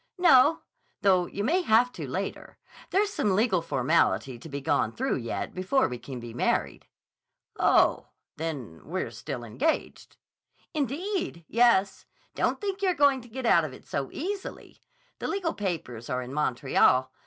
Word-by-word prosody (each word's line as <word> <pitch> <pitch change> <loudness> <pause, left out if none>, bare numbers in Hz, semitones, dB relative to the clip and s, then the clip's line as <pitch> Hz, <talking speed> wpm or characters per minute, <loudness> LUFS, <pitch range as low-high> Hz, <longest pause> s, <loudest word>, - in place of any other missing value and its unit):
"No. 325 -3 +5 0.4
Though 185 -3 +4
you 200 - -4
may 335 - +2
have 245 -4 +4
to, - - -7
later. - - -5 0.3
There's 410 +2 +1
some 200 - +1
legal 205 -4 +2
formality 130 -3 +1
to 160 - -11
be 140 0 -4
gone 115 -4 0
through - - -1
yet 115 -3 -4
before 190 +9 +1
we 125 -1 -6
can 125 +1 -7
be 120 -1 -8
married." 120 - -1 0.7
"Oh, - - +3 0.3
then 140 - -5
we're - - -3
still 120 - -6
engaged." 275 - -2 0.6
"Indeed, 300 - -2
yes! 220 -5 +3 0.3
Don't - - 0
think 395 -2 -3
you're 370 -3 +2
going 280 -3 +4
to 240 - -14
get 255 +2 -5
out 170 -7 +5
of 150 -4 -5
it - - -14
so 135 -1 -3
easily. 390 +5 -6 0.4
The - - -3
legal 370 -5 -1
papers 160 - -4
are 125 0 -1
in 125 +2 -8
Montreal. 130 -2 +2
195 Hz, 155 wpm, -27 LUFS, -, 0.7 s, No